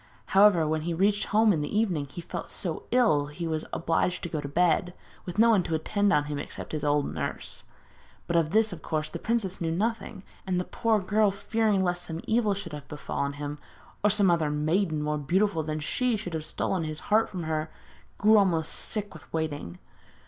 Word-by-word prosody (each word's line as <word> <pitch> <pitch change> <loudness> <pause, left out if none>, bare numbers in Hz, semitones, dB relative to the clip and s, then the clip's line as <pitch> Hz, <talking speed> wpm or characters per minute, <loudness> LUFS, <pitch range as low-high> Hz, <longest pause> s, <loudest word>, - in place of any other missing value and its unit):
However, 190 -5 +6
when 155 0 0
he 170 +1 -2
reached 200 +3 +2
home 215 0 +4
in 155 - -1
the 150 +8 -2
evening, 175 -10 0
he 155 +6 -8
felt 170 - -6
so 170 -4 -4
ill 215 -13 +3
he 160 +4 -6
was 160 -1 -2
obliged 170 +2 0
to 170 - -3
go 155 -2 -3
to 145 - -5
bed, 175 +3 +1 0.3
with 180 +1 -6
no 230 +2 +6
one 210 -4 +4
to 165 -2 -2
attend 205 +6 +1
on 150 -5 +3
him 145 -1 -4
except - - -7
his 155 -2 -3
old 145 -1 +1
nurse. - - -5 0.6
But 170 - -2
of 165 -2 +3
this, 220 +1 +2
of 165 - -9
course, 155 -1 -2
the - - -6
princess 215 -6 -1
knew 165 - 0
nothing; 205 +2 -2 0.2
and 180 -1 +1
the - - 0
poor 225 +2 +1
girl, 205 +2 +2
fearing 205 0 +1
lest 175 -1 -1
some 165 0 -5
evil 220 -3 +1
should 180 -5 -7
have 150 -1 -8
befallen 140 -1 -3
him, 145 +1 -5 0.4
or 210 - +5
some 200 -3 +5
other 165 -3 +2
maiden 155 +2 0
more 150 0 -1
beautiful 180 +4 +1
than 155 0 -3
she 245 +10 0
should 180 -5 -6
have 155 -1 -3
stolen 180 +1 -2
his 155 -1 -4
heart 220 +1 +4
from 180 -3 -5
her, 155 0 -2 0.5
grew 215 +1 +6
almost 165 -5 +1
sick 205 -1 -3
with 155 - -14
waiting. 145 - -3
175 Hz, 210 wpm, -27 LUFS, 155-205 Hz, 0.6 s, However